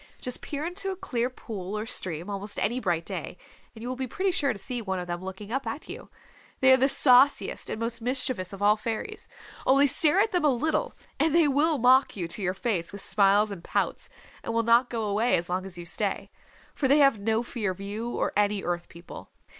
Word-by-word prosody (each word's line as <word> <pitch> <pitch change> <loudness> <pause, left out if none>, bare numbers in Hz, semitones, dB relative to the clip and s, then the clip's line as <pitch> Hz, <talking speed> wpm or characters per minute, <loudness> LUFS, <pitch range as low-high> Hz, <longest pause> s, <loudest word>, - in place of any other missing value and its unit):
Just 250 - -1
peer 295 +1 -4
into 390 +3 -3
a 380 - -3
clear 245 -9 -2
pool 210 -5 -6
or 210 - -3
stream, 180 -7 -3
almost 205 0 -5
any 240 +4 0
bright 175 -7 -1
day, 180 -2 -6 0.4
and 220 - -10
you - - -5
will 255 - -3
be 260 0 -4
pretty 380 +9 -1
sure 290 -7 0
to 220 - -6
see 245 +3 -4
one 190 -3 -3
of 180 - -4
them 175 +1 -5
looking 190 +3 -8
up 270 +2 -2
at 290 - -5
you. - - -9 0.5
They 265 0 +6
are - - +6
the 265 +2 +3
sauciest 270 0 +4
and - - -4
most 230 0 -3
mischievous 250 -6 0
of 200 0 -6
all 210 +1 +5
fairies. 230 - -5 0.4
Only 275 +2 +5
stare 300 +5 +3
at 430 +2 +2
them 360 -3 0
a 300 - +5
little, 305 +5 -1 0.2
and 320 0 +2
they 335 -3 +5
will 295 +3 +2
mock 260 +2 +4
you 175 -3 -3
to 185 - -4
your 185 0 -1
face 195 -5 -2
with 200 - -8
smiles 200 +1 +3
and 180 -4 -8
pouts, - - -2 0.3
and 230 - -4
will 230 - +2
not 235 +2 +4
go 230 -2 -3
away 215 +4 +2
as 175 +1 -5
long 185 +1 -2
as 185 -2 -8
you 175 - -7
stay. 170 - -2 0.4
For 275 - 0
they 280 +3 +5
have 275 -7 +4
no 220 +3 0
fear 230 -4 -3
of 185 0 -5
you 210 +4 -5
or - - -2
any 205 -1 +1
Earth 175 0 -3
People. 170 +1 -11
230 Hz, 235 wpm, -27 LUFS, 195-270 Hz, 0.5 s, They